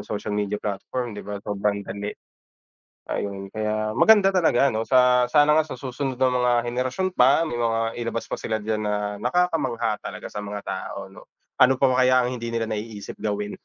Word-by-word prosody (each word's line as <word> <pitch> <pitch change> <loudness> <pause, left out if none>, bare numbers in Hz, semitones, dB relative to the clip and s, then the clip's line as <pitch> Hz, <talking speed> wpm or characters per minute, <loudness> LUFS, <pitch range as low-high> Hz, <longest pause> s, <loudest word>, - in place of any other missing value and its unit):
social 105 0 -4
media 105 0 -1
platform 110 +3 -4
di - - -6
ba, 105 0 -5
sobrang 100 0 -1
dali 100 +1 -4 1.0
ayun 100 -1 -4
kaya 110 0 -2
maganda 200 - +6
talaga 140 -6 +4
'no 110 - -1
sa 125 -1 +5
sana 150 0 +5
nga - - +5
sa - - -7
susunod 130 0 -4
na 130 - +4
mga 125 -1 +2 0.2
henerasyon 130 +10 -1
pa 135 +6 +5
may 140 - -4
mga 115 -1 0
ilabas 115 0 -3
pa - - -2
sila 110 -1 -2
diyan 110 0 -2
na 105 -1 0 0.3
nakakamangha 125 -8 0
talaga 105 - -7
sa 105 - -4
mga 105 0 -5
tao - - -5
'no, - - -14 0.3
ano 130 +1 +7
pa 135 - +4 0.2
kaya 130 0 +5
ang 125 - -2
hindi 115 0 -5
nila 115 -1 0
naiisip 105 -1 -6
gawin. 105 -1 -2
115 Hz, 185 wpm, -24 LUFS, 105-130 Hz, 1.0 s, ano